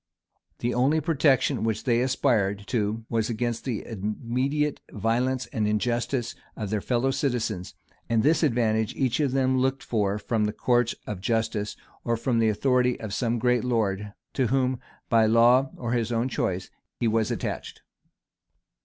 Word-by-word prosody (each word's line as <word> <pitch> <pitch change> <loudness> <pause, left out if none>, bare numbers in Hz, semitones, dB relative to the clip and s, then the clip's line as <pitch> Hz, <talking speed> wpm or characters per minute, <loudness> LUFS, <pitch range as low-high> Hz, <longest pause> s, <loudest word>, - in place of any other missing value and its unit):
The 120 +1 -1
only 135 +6 +3
protection 145 -6 +2
which 110 -1 -1
they 120 -2 +2
aspired 110 -7 +1
to, 110 -1 -1
was 115 -1 0
against 120 0 -2
the 120 -5 -3
immediate 125 +8 -2
violence 125 +4 0
and 110 -5 0
injustice 120 +3 -1 0.2
of 105 -2 -4
their 105 -2 0
fellow 125 +4 +1
citizens; 115 -9 -2 0.3
and 115 -2 +2
this 155 +4 +3
advantage 115 -7 +1
each 130 -1 0
of 145 -4 +1
them 130 -1 +2
looked 135 +1 0
for 105 -3 0
from 105 +1 0
the 105 - -1
courts 120 0 +1
of 100 -3 -5
justice, 110 -2 -1 0.3
or 115 -1 0
from 115 0 0
the 110 -1 +3
authority 125 +3 +2
of 110 -3 -6
some 120 +1 0
great 125 0 +2
lord, 105 -4 0 0.2
to 130 -3 +1
whom, 130 0 +1 0.3
by 115 -2 +4
law 120 +4 +5
or 120 -2 -3
his 120 -2 0
own 115 +2 +1
choice, 95 -6 -2 0.3
he 120 - +1
was 110 -1 +1
attached. - - -4
120 Hz, 160 wpm, -26 LUFS, 110-130 Hz, 0.3 s, law